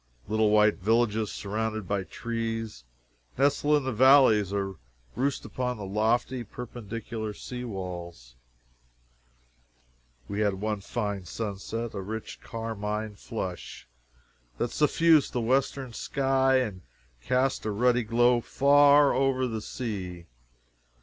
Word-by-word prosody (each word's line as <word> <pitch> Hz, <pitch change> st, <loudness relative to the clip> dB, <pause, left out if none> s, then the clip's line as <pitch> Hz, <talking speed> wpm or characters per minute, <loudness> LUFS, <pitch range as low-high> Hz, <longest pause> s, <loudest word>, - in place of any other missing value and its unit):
Little 110 Hz, 0 st, +2 dB
white 105 Hz, 0 st, +4 dB
villages 110 Hz, +1 st, +1 dB
surrounded 110 Hz, 0 st, -3 dB
by 100 Hz, 0 st, 0 dB
trees, 115 Hz, -, -4 dB, 0.5 s
nestle 145 Hz, +2 st, +3 dB
in 145 Hz, -, -2 dB
the 130 Hz, -1 st, -2 dB
valleys 120 Hz, -5 st, +6 dB
or 100 Hz, -2 st, -2 dB, 0.4 s
roost 135 Hz, +2 st, -1 dB
upon 125 Hz, -1 st, -3 dB
the 105 Hz, -, -6 dB
lofty 115 Hz, +5 st, 0 dB
perpendicular 110 Hz, -1 st, -6 dB
sea 125 Hz, +3 st, -7 dB
walls. 85 Hz, -, -7 dB, 1.9 s
We 100 Hz, -, -4 dB
had 105 Hz, -2 st, +1 dB
one 105 Hz, +1 st, -3 dB
fine 100 Hz, -2 st, -3 dB
sunset 110 Hz, +4 st, -4 dB
a 100 Hz, -, -4 dB
rich 110 Hz, +3 st, -6 dB
carmine 110 Hz, -2 st, -4 dB
flush 95 Hz, -, -6 dB, 0.7 s
that 120 Hz, -, -1 dB
suffused 155 Hz, 0 st, +3 dB
the 125 Hz, -, 0 dB
western 130 Hz, +1 st, 0 dB
sky 135 Hz, +1 st, +1 dB
and 105 Hz, -8 st, -2 dB, 0.4 s
cast 130 Hz, -, 0 dB
a -, -, 0 dB
ruddy 120 Hz, +3 st, +2 dB
glow 120 Hz, +2 st, +3 dB
far 145 Hz, +2 st, +5 dB
over 130 Hz, -1 st, +1 dB
the 110 Hz, -2 st, -4 dB
sea. 95 Hz, -8 st, -5 dB
110 Hz, 115 wpm, -27 LUFS, 105-125 Hz, 1.9 s, valleys